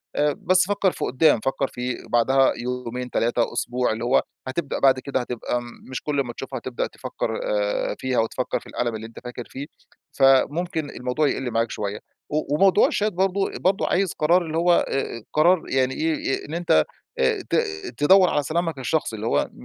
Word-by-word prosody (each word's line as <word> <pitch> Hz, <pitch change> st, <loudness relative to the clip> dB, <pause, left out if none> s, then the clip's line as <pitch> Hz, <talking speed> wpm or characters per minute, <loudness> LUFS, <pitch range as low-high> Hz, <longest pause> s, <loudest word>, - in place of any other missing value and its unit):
آآ، 145 Hz, -1 st, +2 dB
بس 185 Hz, 0 st, +3 dB
فكّر 200 Hz, -2 st, +2 dB
في -, -, -4 dB
قُدّام 130 Hz, -1 st, +3 dB
فكّر 135 Hz, +3 st, -1 dB
في 125 Hz, -1 st, -4 dB
بعدها 130 Hz, +3 st, +4 dB
يومين 125 Hz, 0 st, -4 dB
3 120 Hz, 0 st, 0 dB
أسبوع، 125 Hz, +1 st, 0 dB
اللي 110 Hz, +1 st, -3 dB
هو 125 Hz, +3 st, +3 dB, 0.2 s
هتبدأ 140 Hz, +3 st, -3 dB
بعد 130 Hz, -1 st, +4 dB
كده 135 Hz, 0 st, -2 dB
هتبقى 120 Hz, 0 st, -3 dB, 0.3 s
مش 130 Hz, -, -4 dB
كل 145 Hz, -2 st, -1 dB
امّا 120 Hz, -3 st, -2 dB
تشوفها 130 Hz, +1 st, -6 dB
هتبدأ 120 Hz, +1 st, -3 dB
تفكّر -, -, -4 dB
آآ، -, -, -1 dB
فيها 130 Hz, -1 st, 0 dB
وتفكّر 115 Hz, +3 st, -1 dB
في -, -, -16 dB
الألم 120 Hz, -2 st, -2 dB
اللي 110 Hz, +1 st, -6 dB
أنت 115 Hz, -, -12 dB
فاكر 125 Hz, -1 st, -7 dB
فيه، 135 Hz, +2 st, -6 dB, 0.5 s
فممكن 145 Hz, +4 st, +3 dB
الموضوع 125 Hz, +5 st, -1 dB
يقِلّ 130 Hz, -3 st, -2 dB
معاك 115 Hz, 0 st, 0 dB
شوية، 105 Hz, 0 st, -4 dB, 0.3 s
و 150 Hz, -1 st, 0 dB
وموضوع 195 Hz, +4 st, +5 dB
الChat 210 Hz, -, 0 dB
برضه 195 Hz, 0 st, 0 dB
برضه 190 Hz, +3 st, +1 dB
عايز 190 Hz, -1 st, +1 dB
قرار 170 Hz, +4 st, +3 dB
اللي 160 Hz, 0 st, -3 dB
هو 175 Hz, +1 st, +4 dB
آآ، 120 Hz, -4 st, -3 dB
قرار 170 Hz, +3 st, +4 dB
يعني 130 Hz, 0 st, +1 dB
إيه 155 Hz, -3 st, -1 dB
إن 150 Hz, -, -8 dB
أنت 165 Hz, -, +3 dB, 0.3 s
آآ، -, -, +2 dB
ت -, -, +1 dB, 0.4 s
تدوّر 185 Hz, +5 st, +6 dB
على 145 Hz, -, +1 dB
سلامك 165 Hz, 0 st, -1 dB
الشخصي، 130 Hz, -3 st, -1 dB
اللي 110 Hz, +1 st, -4 dB
هو -, -, +2 dB
آآ، -, -, -2 dB
135 Hz, 185 wpm, -23 LUFS, 125-170 Hz, 0.5 s, تدوّر